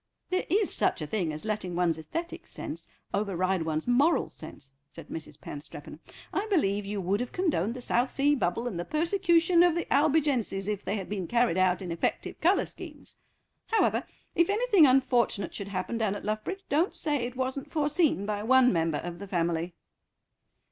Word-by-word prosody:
"There 370 - 0
is 400 +3 +2
such - - +1
a - - -2
thing 170 0 -1
as 155 +4 -6
letting 210 -5 -2
one's 170 -2 +1
æsthetic 335 - -6
sense - - -7 0.3
override 190 -2 0
one's 160 +2 -2
moral 275 +7 +3
sense," 135 -1 -11 0.2
said - - -12
Mrs. 155 -2 -7
Panstreppon. 145 +1 -9 0.3
"I 405 +3 -1
believe 205 - +1
you 205 0 -3
would 195 +2 0
have 245 0 -3
condoned 270 - 0
the 250 - -6
South 245 +1 +1
Sea 285 +3 +2
Bubble 230 -2 -1
and 190 -8 -4
the - - -1
persecution 340 - +3
of 350 -2 +5
the 340 - -1
Albigenses 280 -9 +2
if 210 -1 -2
they 200 - -2
had 195 -3 -4
been 195 -4 -3
carried 235 -5 +2
out 185 0 +2
in 175 - -5
effective 165 - -2
colour 360 +5 +3
schemes. - - -10 0.5
However, 450 - +2 0.3
if 340 +1 +3
anything 410 -6 +5
unfortunate 250 -6 +2
should 200 - -6
happen 200 +4 -3
down 210 -3 0
at 205 - -7
Luffbridge, 215 - -3
don't 315 +7 +1
say 295 -3 0
it 245 -1 -4
wasn't 260 +1 -3
foreseen 300 - +1
by 205 0 -2
one 250 +2 +5
member 165 -3 +1
of 175 +1 -6
the 200 - -7
family." 170 -1 -1
220 Hz, 180 wpm, -28 LUFS, 185-300 Hz, 0.5 s, of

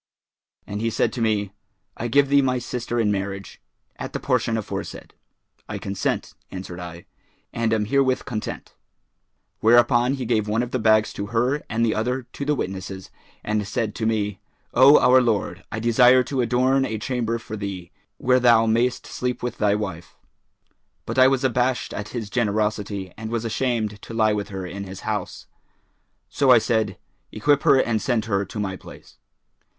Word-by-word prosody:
And 105 +1 -5
he 115 - +1
said - - 0
to 120 - -4
me, 105 -3 0 0.4
'I 120 - -3
give 140 +3 +3
thee 140 0 +5
my 130 -1 +1
sister 120 -1 -3
in 105 -2 +2
marriage, 100 -1 -4 0.4
at - - -6
the - - -2
portion 115 -1 0
aforesaid.' 110 - -6 0.6
'I - - -4
consent,' 100 0 -3 0.2
answered 90 -2 -7
I, 85 -1 -8 0.5
'and 115 -1 0
am 110 -2 +1
herewith 130 +2 +1
content.' 110 -3 -5 0.9
Whereupon 120 +3 +4
he 130 -2 -4
gave 110 -2 +1
one 110 +3 +1
of 125 - -6
the 130 - -1
bags 110 -1 +3
to 100 - -5
her 120 +6 0
and 115 +1 +1
the 110 - +1
other 125 +4 -1
to 140 +3 -7
the 150 +1 +1
witnesses, 95 -3 -5 0.3
and 105 -1 -1
said 105 0 -2
to 110 - -2
me, 105 -3 -1 0.3
'O 135 +3 +8
our 130 +1 +6
lord, 115 -4 -1
I 110 - -3
desire 125 +3 +5
to 130 +1 -2
adorn 130 +3 +2
a 110 -4 -2
chamber 115 0 -2
for 110 -1 -8
thee, 100 -4 -6 0.3
where 125 0 +3
thou 120 -2 +5
mayst 115 +3 +1
sleep 125 -1 -4
with 125 -1 -4
thy 105 -1 +3
wife.' 95 -5 -6 0.9
But - - -2
I 130 - +8
was 135 0 +1
abashed 125 0 0
at 105 - -5
his 110 -4 -5
generosity 105 -4 -1
and 110 0 -6
was 115 0 -2
ashamed 110 -3 -1
to 115 - -9
lie 110 -1 +3
with 105 -1 -3
her 95 -2 -5
in 100 +2 -6
his 95 0 -9
house; - - -4 0.8
so 140 - +1
I 125 - +9
said, 110 -3 0 0.3
'Equip 145 +6 +2
her - - +5
and 115 -3 +1
send 120 -5 0
her 100 -3 0
to 105 - -7
my 95 -2 -2
place.' - - -14
115 Hz, 180 wpm, -23 LUFS, 105-125 Hz, 0.9 s, I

